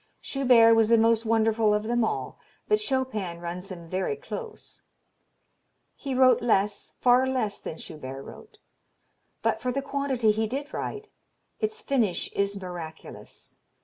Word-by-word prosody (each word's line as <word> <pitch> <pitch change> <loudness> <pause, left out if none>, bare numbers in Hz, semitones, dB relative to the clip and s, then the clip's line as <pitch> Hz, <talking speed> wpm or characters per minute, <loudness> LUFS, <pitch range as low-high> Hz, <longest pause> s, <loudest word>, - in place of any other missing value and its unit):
Schubert 245 -4 +5
was 225 -1 +4
the 230 - +6
most 225 0 +3
wonderful 220 -1 +3
of 210 - -1
them 240 +1 +1
all, - - -3 0.3
but 425 0 +3
Chopin 260 - -2
runs 175 +2 -6
him 170 -2 -8
very 185 - -1
close.... 460 0 -8 1.1
He 270 -2 -4
wrote 255 -1 +5
less, 205 -3 0
far 250 +1 +4
less 250 -6 -1
than 160 - -7
Schubert 135 -4 -8
wrote; - - -13 0.9
but, - - +1
for 250 - -1
the 275 +2 -2
quantity 275 -5 +1
he 220 +1 0
did 280 +5 -5
write, 425 0 -5 0.5
its 435 0 -3
finish 235 - 0
is 200 0 -1
miraculous. 175 -4 -9
230 Hz, 145 wpm, -27 LUFS, 200-265 Hz, 1.1 s, the